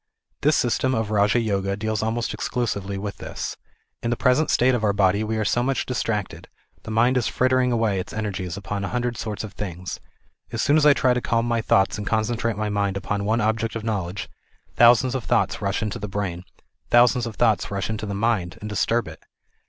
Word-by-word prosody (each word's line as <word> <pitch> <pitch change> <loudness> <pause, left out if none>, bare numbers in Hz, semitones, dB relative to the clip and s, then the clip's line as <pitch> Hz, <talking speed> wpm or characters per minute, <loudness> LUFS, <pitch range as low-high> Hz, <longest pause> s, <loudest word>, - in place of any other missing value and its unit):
This 150 +1 +3
system 130 +2 +1
of 110 -1 -2
Raja 105 +2 +3
Yoga, 100 -3 -1
deals 110 0 -2
almost 115 +1 -1
exclusively 100 -5 -2
with 100 0 -5
this. - - -5 0.5
In 115 - -2
the 120 - +1
present 130 +5 +2
state 130 +1 +3
of 120 -3 -1
our 105 -1 +3
body 100 +1 +2
we 110 +1 -2
are 110 - 0
so 120 - +1
much 135 +2 0
distracted, 110 -5 -3 0.3
the - - -10
mind 120 +4 +3
is 120 - +1
frittering 130 0 +2
away 110 -5 +1
its 90 - -6
energies 95 -4 -4
upon 100 0 -4
a - - -1
hundred 120 +1 -2
sorts 110 -2 -4
of 105 -2 -8
things. 90 -3 -6 0.5
As 115 - -4
soon 145 - +3
as 155 -1 +5
I 145 - +8
try 130 -2 +2
to 125 - -1
calm 115 0 0
my 115 -1 +1
thoughts 95 -1 +2
and 105 - -5
concentrate 115 0 0
my 105 0 -1
mind 100 -1 0
upon 100 +1 -2
one 110 +3 +1
object 110 +1 0
of 115 - -4
knowledge, 100 -4 -3 0.5
thousands 120 +2 +5
of 130 -3 -2
thoughts - - +1
rush - - -1
into 105 -2 -3
the 105 - -4
brain, 95 -3 -3 0.4
thousands 120 0 +4
of 110 - -7
thoughts 110 -4 +2
rush 100 -1 -2
into 110 -1 -4
the 100 - -3
mind 100 -5 0
and 105 - -6
disturb" 115 0 0
it. 80 0 -10
110 Hz, 215 wpm, -23 LUFS, 100-120 Hz, 0.5 s, I